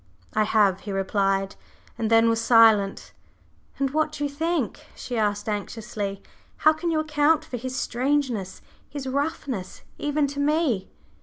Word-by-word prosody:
"I 215 Hz, -, +2 dB
have," 205 Hz, -3 st, +3 dB
he 205 Hz, -, -7 dB
replied, 195 Hz, 0 st, 0 dB, 0.4 s
and 225 Hz, -2 st, -2 dB
then 225 Hz, 0 st, +5 dB
was 230 Hz, 0 st, +2 dB
silent. 225 Hz, -4 st, +4 dB, 0.6 s
"And 275 Hz, -1 st, 0 dB
what 310 Hz, +1 st, +1 dB
do 290 Hz, -, -4 dB
you 285 Hz, -, -1 dB
think?" 315 Hz, -, -2 dB
she 245 Hz, -, -6 dB
asked 205 Hz, -2 st, 0 dB
anxiously. 210 Hz, -1 st, -4 dB, 0.3 s
"How 310 Hz, -, +5 dB
can 325 Hz, +2 st, -3 dB
you 320 Hz, -1 st, +1 dB
account 310 Hz, +1 st, +2 dB
for 255 Hz, -, -5 dB
his 255 Hz, +2 st, -5 dB
strangeness 255 Hz, -7 st, -1 dB, 0.3 s
his 285 Hz, -2 st, -6 dB
roughness 270 Hz, -, -3 dB, 0.2 s
even 295 Hz, 0 st, +1 dB
to 280 Hz, 0 st, -5 dB
me?" 285 Hz, -, +1 dB
245 Hz, 150 wpm, -25 LUFS, 210-290 Hz, 0.6 s, then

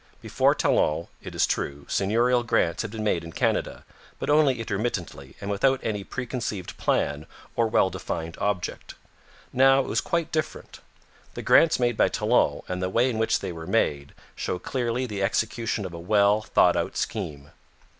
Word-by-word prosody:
Before -, -, +2 dB
Talon, 75 Hz, +2 st, +1 dB
it -, -, -9 dB
is -, -, +3 dB
true, 70 Hz, 0 st, -3 dB
seigneurial 120 Hz, +5 st, +2 dB
grants 120 Hz, -, +1 dB
had 110 Hz, -, -4 dB
been 110 Hz, 0 st, -5 dB
made 90 Hz, -6 st, 0 dB
in 85 Hz, -, -8 dB
Canada, -, -, -1 dB, 0.3 s
but -, -, -2 dB
only 145 Hz, -5 st, +4 dB
intermittently 95 Hz, -, -4 dB
and 100 Hz, 0 st, -4 dB
without 130 Hz, +7 st, +2 dB
any 105 Hz, -2 st, -2 dB
preconceived 120 Hz, -5 st, -5 dB
plan 75 Hz, +2 st, -1 dB, 0.3 s
or 115 Hz, -1 st, +2 dB
well 95 Hz, -3 st, +2 dB
defined 80 Hz, 0 st, -5 dB
object. 100 Hz, -3 st, -3 dB, 0.6 s
Now 135 Hz, +1 st, +5 dB
it -, -, -5 dB
was -, -, 0 dB
quite 170 Hz, -2 st, -1 dB
different. 155 Hz, -1 st, -4 dB, 0.6 s
The -, -, -5 dB
grants 165 Hz, -4 st, +5 dB
made 120 Hz, -2 st, +1 dB
by -, -, +4 dB
Talon, -, -, +1 dB
and 90 Hz, 0 st, -3 dB
the 90 Hz, -, -1 dB
way 120 Hz, +6 st, +2 dB
in 110 Hz, -, -3 dB
which 110 Hz, -, +1 dB
they -, -, -4 dB
were 80 Hz, -1 st, -8 dB
made, 70 Hz, -1 st, 0 dB, 0.2 s
show 90 Hz, -, -3 dB
clearly 120 Hz, +4 st, -2 dB
the 105 Hz, -5 st, -4 dB
execution 110 Hz, +1 st, -1 dB
of 90 Hz, -, -7 dB
a 85 Hz, -, -7 dB
well 100 Hz, +3 st, +3 dB
thought -, -, +3 dB
out -, -, -2 dB
scheme. 80 Hz, -9 st, -4 dB
105 Hz, 175 wpm, -25 LUFS, 90-120 Hz, 0.6 s, Now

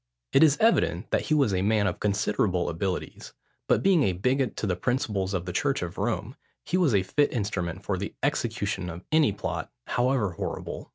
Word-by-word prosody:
It -, -, +6 dB
is 150 Hz, -3 st, +6 dB
evident 225 Hz, +1 st, +2 dB
that -, -, 0 dB
he 155 Hz, -, +4 dB
was 135 Hz, -9 st, +3 dB
a 90 Hz, -, +1 dB
man 105 Hz, +1 st, +2 dB
of -, -, -1 dB
considerable 100 Hz, -3 st, 0 dB
abilities; 90 Hz, +3 st, -4 dB, 0.3 s
but -, -, +2 dB
being 190 Hz, -4 st, +4 dB
a 95 Hz, -9 st, +2 dB
bigot 125 Hz, +7 st, 0 dB
to -, -, -3 dB
the 95 Hz, -3 st, 0 dB
principles 100 Hz, -3 st, -1 dB
of 90 Hz, -1 st, -2 dB
the 90 Hz, -, -5 dB
church -, -, 0 dB
of -, -, -6 dB
Rome, -, -, -2 dB, 0.3 s
he 170 Hz, -, -1 dB
was 170 Hz, -, +3 dB
a 95 Hz, -, +3 dB
fit 145 Hz, +9 st, +1 dB
instrument 95 Hz, -5 st, -3 dB
for 95 Hz, -3 st, -1 dB
the 100 Hz, -, -5 dB
execution 110 Hz, -9 st, -1 dB
of 85 Hz, +2 st, -8 dB
any 155 Hz, -6 st, +4 dB
plot, 90 Hz, -4 st, -4 dB, 0.2 s
however 120 Hz, -5 st, +1 dB
horrible. 85 Hz, -, -5 dB
105 Hz, 195 wpm, -27 LUFS, 95-135 Hz, 0.3 s, It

